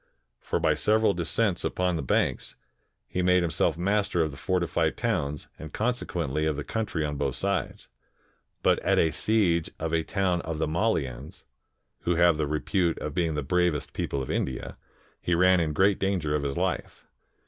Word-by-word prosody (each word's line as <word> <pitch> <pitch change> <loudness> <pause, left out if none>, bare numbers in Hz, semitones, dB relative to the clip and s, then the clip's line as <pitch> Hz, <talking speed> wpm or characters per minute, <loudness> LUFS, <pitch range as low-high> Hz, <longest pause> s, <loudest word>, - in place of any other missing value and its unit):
For - - -2
by - - +3
several 110 -1 +2
descents 90 +4 0
upon 90 -1 0
the 80 - -2
banks, 65 - 0 0.5
he 90 - -2
made 90 0 +4
himself 80 -1 0
master 100 -1 +1
of 80 - -2
the - - -10
fortified 90 +3 0
towns, 70 +1 -2
and 80 -1 -8
consequently 85 - -1
of 75 - 0
the 75 - -4
country 105 -7 -2
on 75 -1 -3
both - - -1
sides. 100 0 -2 0.8
But - - +4
at - - +1
a 80 - +3
siege 90 -7 +2
of 80 0 -3
a 80 - +3
town 90 0 0
of 80 -1 -4
the 80 - 0
Mallians, 80 - -2 0.6
who 85 - 0
have 85 -1 +4
the 75 -1 0
repute 85 +3 0
of 75 - -5
being 80 -2 0
the 75 - -2
bravest 90 0 0
people 70 -1 -2
of - - -5
India, 65 - -3 0.5
he 85 - +1
ran 90 +1 +5
in 80 -2 0
great 95 +5 +3
danger 95 -6 0
of 75 - +1
his 70 -1 -3
life. - - -2
85 Hz, 180 wpm, -27 LUFS, 75-95 Hz, 0.8 s, ran